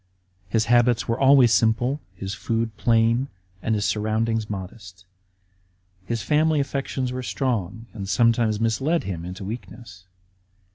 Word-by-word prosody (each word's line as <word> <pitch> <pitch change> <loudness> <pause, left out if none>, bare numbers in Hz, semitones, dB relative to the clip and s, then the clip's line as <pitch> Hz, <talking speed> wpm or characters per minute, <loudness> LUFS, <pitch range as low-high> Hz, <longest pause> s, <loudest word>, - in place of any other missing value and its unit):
His 110 +2 +1
habits 120 0 +3
were 115 0 -1
always 135 -4 +6
simple, 120 +6 +2
his 95 +2 -5
food 115 -1 -2
plain, 115 +3 +2 0.3
and 110 - 0
his 105 -1 -1
surroundings 110 +2 0
modest. 95 -2 -8 1.0
His 115 +3 -3
family 155 0 +2
affections 135 -2 -2
were 130 0 -4
strong 115 -5 -2
and 100 -3 -6
sometimes 115 -1 +2
misled 135 +9 +1
him 85 -4 -5
into 90 +3 -7
weak 115 +5 -6
ness. 90 -6 -13
115 Hz, 135 wpm, -24 LUFS, 105-125 Hz, 1.0 s, always